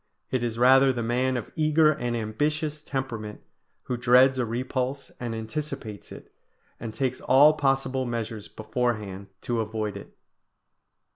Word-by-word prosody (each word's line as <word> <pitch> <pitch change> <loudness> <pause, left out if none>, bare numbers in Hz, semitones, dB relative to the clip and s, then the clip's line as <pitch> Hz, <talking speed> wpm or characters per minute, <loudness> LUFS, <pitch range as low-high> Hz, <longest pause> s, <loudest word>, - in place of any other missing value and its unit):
It 130 - 0
is 115 -1 -2
rather 130 +2 +6
the 120 -2 -3
man 125 +2 0
of 115 - -6
eager 155 0 +4
and 120 -4 -2
ambitious 150 +7 -2
temperament, 120 -8 -5 0.4
who 125 - -3
dreads 130 +2 +5
a 120 - 0
repulse 130 +3 -3
and 120 -2 -4
anticipates 110 -2 -6
it, - - -12 0.5
and 115 - -5
takes 130 +3 -2
all 145 +4 +6
possible 135 -2 0
measures 115 -3 -4
beforehand 110 -4 -3
to 120 -1 -2
avoid 110 -1 -3
it. - - -13
125 Hz, 140 wpm, -26 LUFS, 115-135 Hz, 0.5 s, rather